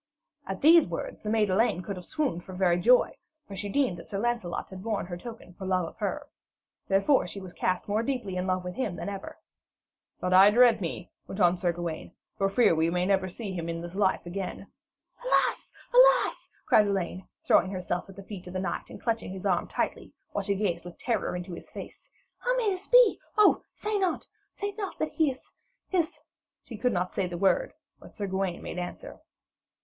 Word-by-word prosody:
At 195 -1 -4
these 330 +2 +7
words 170 - -5
the 210 - -4
maid 215 -3 +2
Elaine 185 -2 +2
could 200 +3 -4
have 180 -1 -9
swooned 280 - -1
for 190 - -10
very 180 -2 +2
joy, 245 +7 +5 0.4
for 200 - -8
she 205 +1 -4
deemed 250 -6 +1
that - - -11
Sir 200 - -3
Lancelot 230 -6 -2
had 185 -1 -8
borne 215 -1 -2
her 175 0 -6
token 220 -1 -10
for 190 +1 -7
love 185 -2 +1
of - - -10
her. - - -3 0.6
Therefore, 195 +8 +3
she 200 - -7
was 185 -2 -10
cast 185 0 -1
more 210 +2 +1
deeply 235 -7 -2
in 180 +1 -2
love 185 0 0
with 180 0 -5
him 210 -7 -2
than 200 - -4
ever. 195 -1 -7 0.8
'But 180 - 0
I 190 +2 +9
dread 235 0 +5
me,' 170 0 -5 0.2
went 190 - -7
on 175 -2 +5
Sir 175 -1 0
Gawaine, 170 0 -5 0.2
'for 195 - +1
I - - -4
fear 235 -2 +4
we 160 +1 +2
may 180 +1 0
never 190 -1 +1
see 200 +1 -5
him 170 -2 -4
in 165 0 -3
this 170 +1 -7
life 190 -2 +1
again.' 185 +2 -5 0.6
'Alas! - - +1 0.2
alas!' - - +5 0.2
cried 210 -1 +5
Elaine, 190 -1 -2 0.2
throwing 185 - +4
herself 180 -1 -3
at 195 - -11
the 195 - -10
feet 190 -2 -9
of 180 - -8
the 185 - -2
knight, 190 - -3
and - - -10
clutching 230 -5 -2
his 190 +1 -7
arm 180 -3 +1
tightly, - - -3 0.2
while - - -1
she 200 - 0
gazed 185 -4 -1
with 175 0 -10
terror 235 -6 -1
into 180 0 -5
his - - -10
face. - - -10 0.3
'How - - 0
may 445 -5 +2
this 375 +1 -5
be? - - +6 0.2
oh, 425 - +6
say 420 -1 -2
not 375 -2 -1 0.2
say 405 0 -4
not 400 -2 -5
that 310 - -1
he 315 -3 +2
is 260 - -9 0.4
is 335 -4 0 0.2
' - - -64
She 235 - -7
could 250 +4 +1
not 180 +1 -1
say 190 - 0
the 175 -1 -5
word, 350 - +2 0.3
but - - -15
Sir 205 - -3
Gawaine 190 -2 -2
made - - -5
answer. 175 0 -7
195 Hz, 215 wpm, -28 LUFS, 180-240 Hz, 0.8 s, I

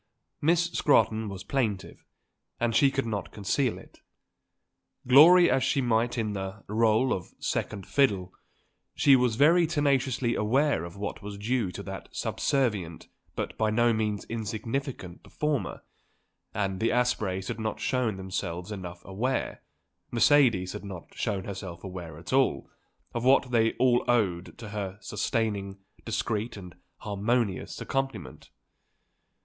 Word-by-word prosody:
Miss 170 +2 +2
Scrotton 110 -6 +2
was 95 -1 -7
plaintive, 110 -8 -2 0.6
and 115 -1 0
she 140 -2 +5
could 135 -1 -2
not 105 -4 -4
conceal 110 +5 0
it. - - -16 1.1
Glory 170 +7 +8
as 130 - +2
she 135 +1 +1
might 120 -1 +1
in 110 -2 -1
the 95 +2 -6
rôle 110 +3 +2
of 90 - -6
second 100 -3 -3
fiddle, 100 -10 +1 0.6
she 140 -2 +6
was 125 -3 +2
very 165 +6 +5
tenaciously 135 -6 +1
aware 125 - +1
of 85 +2 -10
what 100 0 -5
was 100 0 -7
due 110 -1 -1
to - - -6
that - - -8
subservient 105 - -1 0.3
but - - -4
by 110 -1 +2
no 120 +2 +3
means 105 -2 -1
insignificant 115 - -4
performer; 150 -3 -3 0.7
and 95 -2 -2
the 115 - +2
Aspreys 110 -6 0
had - - -4
not 110 0 -3
shown 125 -6 0
themselves 95 -1 -4
enough 90 -4 -7
aware, 115 +8 -2 0.5
Mercedes 115 -7 +4
had - - -7
not 95 -4 -9
shown 100 -5 -2
herself 95 -3 -7
aware 90 -5 -7
at 85 +8 -7
all, 135 0 +2 0.4
of 120 - -3
what 130 0 +4
they 115 -2 +3
all 125 -1 +3
owed 95 -8 0
to 110 - -8
her 100 -2 -4
sustaining, 105 -4 -2 0.3
discreet 115 0 -2
and 90 -3 -10 0.3
harmonious 105 0 -1
accompaniment. 135 0 -4
110 Hz, 135 wpm, -28 LUFS, 95-130 Hz, 1.1 s, Glory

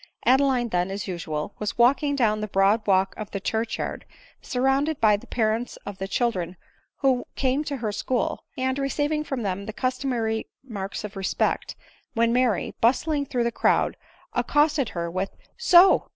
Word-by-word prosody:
Adeline 260 -2 +3
then, 180 -1 0
as 195 0 -4
usual, 165 -1 -4
was 210 - -3
walking 280 +4 +3
down 215 -5 +2
the 215 - -2
broad 200 +3 +2
walk 190 -1 +3
of 215 - -6
the 200 - -4
church 225 +3 -2
yard, - - -4 0.4
surrounded 270 +3 +1
by 215 -2 +5
the 205 - -9
parents 225 +1 -1
of 200 -2 -7
the 195 - -3
children 190 -5 -1 0.4
who 260 -3 +3
came 270 +2 +1
to 285 -2 -3
her 225 -4 -2
school, 240 +4 -1
and 260 +1 0
receiving 290 +2 0
from 270 -5 -3
them 200 0 -3
the - - -3
customary 245 -3 -1 0.2
marks 205 -7 -5
of 210 -2 -7
respect, 195 -1 -1 0.4
when 230 0 +3
Mary, 245 -6 +1
bustling 285 +4 +2
through 245 -2 0
the 235 - 0
crowd, - - +2 0.4
accosted 295 -3 +2
her 170 0 -1
with 185 +2 -2 0.2
— - - -30
" - - -41
So 360 +2 +7
235 Hz, 175 wpm, -25 LUFS, 200-270 Hz, 0.4 s, So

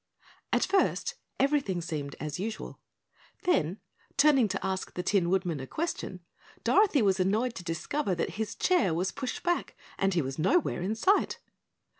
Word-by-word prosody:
At - - +3
first, 400 +4 +1 0.3
everything 275 -10 +2
seemed 150 -4 -4
as 150 +2 -4
usual. 220 +3 -5 0.6
Then, 185 - +1 0.4
turning 280 -5 +5
to 190 -1 -3
ask 190 -1 -3
the 180 - -2
Tin 185 -4 +2
Woodman 180 -5 0
a 130 - -6
question, 305 - -3 0.4
Dorothy 375 - +4
was 190 -2 +3
annoyed 215 +7 +1
to 180 - -6
discover 185 - -1
that 170 - -1
his 220 - -3
chair 215 - +2
was 185 +3 0
pushed 255 - -4
back 350 0 0 0.2
and 195 -1 +2
he 170 - +2
was 135 +2 -5
nowhere 250 - +2
in 200 +5 -1
sight. 380 - +2
195 Hz, 160 wpm, -29 LUFS, 175-275 Hz, 0.6 s, turning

